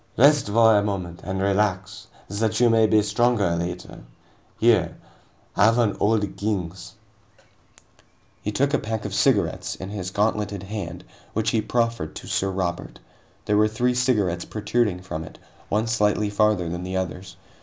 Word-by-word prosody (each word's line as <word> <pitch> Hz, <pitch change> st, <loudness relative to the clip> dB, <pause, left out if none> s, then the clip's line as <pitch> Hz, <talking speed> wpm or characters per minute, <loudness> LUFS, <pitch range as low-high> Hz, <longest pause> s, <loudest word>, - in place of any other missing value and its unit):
"Rest 145 Hz, +1 st, +5 dB
for 110 Hz, +1 st, +5 dB
a 105 Hz, -, +4 dB
moment 95 Hz, -4 st, -4 dB
and 95 Hz, +2 st, -3 dB
relax, 100 Hz, +1 st, -1 dB, 0.2 s
that 110 Hz, +1 st, -1 dB
you 120 Hz, -1 st, +5 dB
may 110 Hz, -1 st, +4 dB
be 110 Hz, -, +3 dB
the -, -, -3 dB
stronger 105 Hz, -3 st, +1 dB
later. 85 Hz, +1 st, -5 dB, 0.6 s
Here 110 Hz, -8 st, +3 dB, 0.6 s
have 115 Hz, +2 st, +4 dB
an 115 Hz, -4 st, +2 dB
Old 105 Hz, -2 st, +1 dB
Kings." 95 Hz, -4 st, -3 dB, 1.5 s
He -, -, -3 dB
had 140 Hz, +2 st, +1 dB
a 145 Hz, -, +3 dB
pack 110 Hz, -1 st, -4 dB
of -, -, -4 dB
cigarettes -, -, +1 dB
in 95 Hz, +2 st, -8 dB
his 95 Hz, -3 st, -4 dB
gauntleted 105 Hz, -1 st, -1 dB
hand, 100 Hz, -4 st, -6 dB, 0.3 s
which 110 Hz, 0 st, 0 dB
he 110 Hz, -, +1 dB
profferred 115 Hz, -10 st, -1 dB
to -, -, -8 dB
Sir 95 Hz, -, -1 dB
Robert. 90 Hz, -2 st, -3 dB, 0.5 s
There 105 Hz, -, +2 dB
were 105 Hz, +1 st, +5 dB
three 120 Hz, +3 st, 0 dB
cigarettes 105 Hz, -9 st, +1 dB
protruding 105 Hz, -3 st, -1 dB
from 80 Hz, -3 st, -5 dB
it, 80 Hz, -, -12 dB, 0.3 s
one 105 Hz, +2 st, +1 dB
slightly 105 Hz, -2 st, +1 dB
farther 105 Hz, -4 st, +2 dB
than 85 Hz, +1 st, -4 dB
the 95 Hz, +1 st, -3 dB
others. 95 Hz, +1 st, -5 dB
105 Hz, 160 wpm, -24 LUFS, 95-110 Hz, 1.5 s, Rest